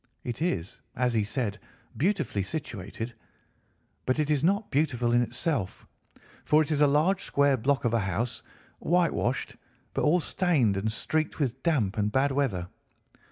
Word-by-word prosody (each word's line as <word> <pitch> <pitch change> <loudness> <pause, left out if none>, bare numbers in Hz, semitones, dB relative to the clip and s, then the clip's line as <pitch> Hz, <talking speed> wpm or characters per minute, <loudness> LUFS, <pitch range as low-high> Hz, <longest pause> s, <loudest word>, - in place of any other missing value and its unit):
It 120 +4 -5
is, 95 - -2
as 125 -1 +1
he 110 -2 +2
said, 105 -1 -2 0.4
beautifully 160 - 0
situated, 115 - -5 0.9
but 130 - +2
it 155 -1 +1
is 145 -1 +1
not 200 +5 +1
beautiful 130 -5 +1
in 120 0 +4
itself, 120 - -2 0.6
for 155 +1 +4
it 155 - -5
is 150 -1 +1
a 145 - +7
large 155 +7 +2
square 140 -1 +3
block 130 +2 0
of 120 - +1
a 115 - +3
house, 110 +4 -2 0.4
whitewashed, 170 -8 0 0.4
but - - -1
all 165 +4 +4
stained 155 - +1
and 105 +3 -1
streaked 155 +7 -1
with 130 -3 -1
damp 115 - +1
and 105 0 +1
bad 135 +4 +2
weather. 120 -11 0
130 Hz, 160 wpm, -28 LUFS, 110-155 Hz, 0.9 s, a